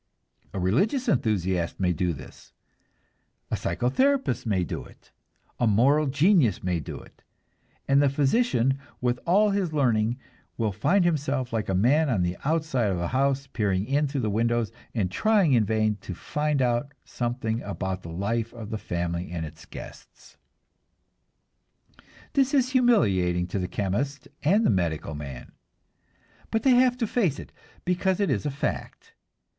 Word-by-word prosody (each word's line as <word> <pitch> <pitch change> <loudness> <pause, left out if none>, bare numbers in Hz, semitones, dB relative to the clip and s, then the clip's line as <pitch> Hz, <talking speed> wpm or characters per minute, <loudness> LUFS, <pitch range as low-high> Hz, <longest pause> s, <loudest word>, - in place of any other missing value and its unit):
A 95 - -4
religious 195 - +1
enthusiast 95 - 0
may 90 -2 +2
do 90 +2 0
this, 75 - -11 1.0
a - - +2
psychotherapist 260 - 0
may 95 -4 +1
do - - -4
it, - - -19 0.5
a 120 - +3
moral 135 +8 +4
genius 145 - +3
may 90 -2 0
do 75 - -7
it; - - -18 0.7
and 140 +1 +4
the 140 - +4
physician 140 - +2 0.2
with 125 0 0
all 205 +4 +4
his 195 -5 -1
learning 120 -5 +2 0.4
will 110 -3 0
find 175 - +2
himself 140 -6 -1
like 110 -3 -1
a 95 - +1
man 140 - +3
on 105 -8 +1
the 90 0 -1
outside 150 -7 0
of 95 - -1
a 85 - -2
house, 135 +1 +1
peering 100 -6 -1
in 145 +3 +1
through 140 -1 -2
the 110 -3 -1
windows 115 +1 +1 0.2
and 95 -6 0
trying 200 - +3
in 115 -4 +4
vain 110 0 +1
to 95 - -8
find 150 - -1
out 125 +3 -1
something 120 -1 -2
about 95 -2 -4
the 85 - -9
life 110 +7 -2
of 115 -3 -8
the 110 - -3
family 85 -1 -3
and 85 -2 -3
its 80 +1 -12
guests. - - -12 2.0
This 270 +1 +2
is 255 -2 +2
humiliating 95 - +3
to 100 - -2
the 90 - -2
chemist 120 +10 -2
and 200 +10 +3
the - - +4
medical 85 -6 -1
man, 70 -4 -8 1.0
but 225 - -1
they 270 - +5
have 250 0 +4
to 240 - 0
face 195 - 0
it, - - -10 0.3
because 185 +1 +1
it 200 - +1
is - - -1
a - - 0
fact. 145 +2 -4
120 Hz, 160 wpm, -26 LUFS, 95-155 Hz, 2.0 s, they